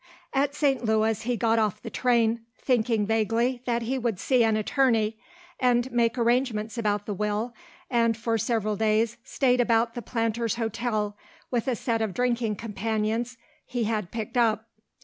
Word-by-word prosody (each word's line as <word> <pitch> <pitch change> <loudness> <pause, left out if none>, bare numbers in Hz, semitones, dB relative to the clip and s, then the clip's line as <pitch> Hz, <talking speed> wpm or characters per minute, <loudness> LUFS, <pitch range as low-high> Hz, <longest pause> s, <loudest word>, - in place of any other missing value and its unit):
At 280 +1 +1
St. 275 -4 +1
Louis 220 -1 +1
he 245 +1 -1
got 225 -1 +2
off 215 -3 0
the - - -6
train, 235 -2 +2 0.2
thinking 230 -4 +1
vaguely 225 +3 +1
that 235 -1 0
he 260 +3 -1
would 230 -6 -1
see 255 +1 +3
an 220 -1 +2
attorney 225 -2 +1 0.4
and 250 0 +2
make 235 0 +1
arrangements 235 -2 +1
about 210 -3 0
the 210 - -3
will, 210 +4 -2 0.3
and 230 -2 +2
for 230 0 0
several 215 -1 0
days 220 +2 +1
stayed 255 -2 +2
about 230 -1 +2
the 240 - -5
Planters 230 0 -1
Hotel 225 -2 -2 0.4
with 240 -1 0
a 255 - +1
set 230 -1 -1
of 215 -4 -2
drinking 240 -3 0
companions 225 +2 -2 0.3
he 245 -1 -2
had 215 -4 -1
picked 225 +3 -4
up. 225 -1 +2
230 Hz, 165 wpm, -26 LUFS, 220-245 Hz, 0.4 s, see